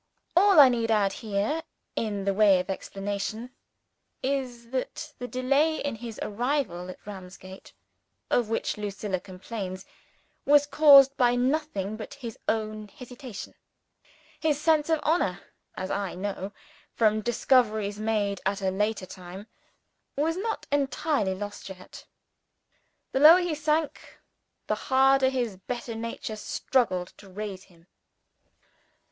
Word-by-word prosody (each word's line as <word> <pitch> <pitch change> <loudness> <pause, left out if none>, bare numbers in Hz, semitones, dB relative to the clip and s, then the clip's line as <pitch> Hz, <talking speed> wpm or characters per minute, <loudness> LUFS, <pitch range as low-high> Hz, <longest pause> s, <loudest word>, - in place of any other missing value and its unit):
All 385 -1 +6
I 280 - +11
need 230 -2 0
add 205 -3 +2
here, 215 +8 -2 0.3
in 205 -3 -2
the 200 - +2
way 200 -2 +5
of 180 +1 -3
explanation, 205 +5 -4 0.7
is 250 -3 -3
that 275 +3 -4
the 245 - -4
delay 275 +6 +1
in 285 - -2
his 225 -1 -8
arrival 210 -6 -2
at 185 - -11
Ramsgate 190 -1 -10 0.6
of 240 -3 +2
which 225 - -1
Lucilla 200 -2 -3
complains, 185 0 -7 0.6
was 290 0 +5
caused 280 -2 +7
by 245 -1 +4
nothing 245 -6 -1
but 220 - -8
his 240 -5 -8
own 215 -1 -1
hesitation. 250 -3 -9 0.9
His 300 -3 +1
sense 310 0 +2
of 320 -1 +3
honor 300 - +1 0.4
as 185 - -4
I 200 -2 -2
knew, 195 +1 -4 0.4
from 215 -1 +3
discoveries 220 -3 +2
made 210 -3 -1
at 195 +1 0
a 190 -1 0
later 210 0 -1
time 185 +2 -10 0.7
was 315 +3 0
not 440 +4 -3
entirely 275 -6 0
lost 205 0 -7
yet. 185 -1 -11 1.0
The 265 - 0
lower 310 +5 +10
he 350 -2 -1
sank, 305 0 -2 0.5
the - - 0
harder 270 0 +3
his 240 -7 -2
better 235 +4 -5
nature 225 -1 -5
struggled 190 -6 0
to 200 - -14
raise 195 -1 -6
him. 170 -3 -23
225 Hz, 130 wpm, -27 LUFS, 200-275 Hz, 1.0 s, I